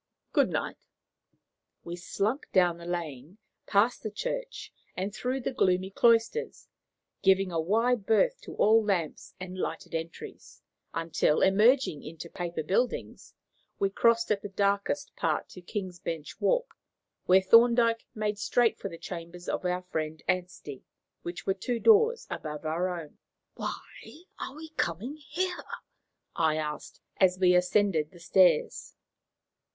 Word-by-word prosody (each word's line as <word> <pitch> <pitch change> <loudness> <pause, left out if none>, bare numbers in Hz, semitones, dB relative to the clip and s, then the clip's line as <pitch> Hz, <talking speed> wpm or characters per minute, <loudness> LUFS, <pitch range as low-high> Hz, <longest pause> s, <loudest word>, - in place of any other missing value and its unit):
Good - - +4
night." - - -4 1.0
We 170 - -6
slunk 200 +8 -2
down 180 -3 +3
the 170 - -9
lane, 165 -1 -5 0.3
past 220 +4 +2
the 215 - -3
church, - - -5 0.2
and 195 +2 -2
through 255 +4 -2
the 255 - -3
gloomy 185 -4 +1
cloisters, 230 - +2 0.5
giving 190 -1 +3
a 165 -1 0
wide 225 +4 +1
berth - - +3
to - - -9
all 220 +1 +5
lamps 185 -7 -2
and 185 0 -7
lighted 165 -2 -4
entries, 165 +1 -7 0.3
until, 165 -2 +1
emerging 210 - +4
into 165 +2 -9
Paper 175 -3 -4
Buildings, 220 +10 -2 0.4
we 195 0 0
crossed 230 +2 +3
at 205 -1 +1
the 205 - -6
darkest 200 +8 -1
part - - -1
to 180 - -11
King's 185 -1 -5
Bench 165 -4 -6
Walk, - - +1 0.5
where 185 +1 +7
Thorndyke 230 +3 +4
made 210 -1 -2
straight 235 +3 +2
for 195 - -4
the 165 - -9
chambers 175 +1 -8
of - - -2
our 180 0 -1
friend 160 -3 -4
Anstey, 180 -7 -3 0.4
which 175 0 -7
were 195 - +2
two 235 +5 -3
doors 450 - +4
above 150 0 -6
our 170 +4 0
own. 155 -3 -12 0.3
"Why 325 - -8 0.2
are 265 - -6
we 320 +1 -9
coming 215 - -2
here?" 355 +5 -3 0.7
I 160 -2 +2
asked, 150 -1 -5 0.2
as 185 -1 +4
we 180 -1 +4
ascended 180 -3 +2
the 175 - -16
stairs. 170 -1 +2
190 Hz, 140 wpm, -29 LUFS, 170-230 Hz, 1.0 s, where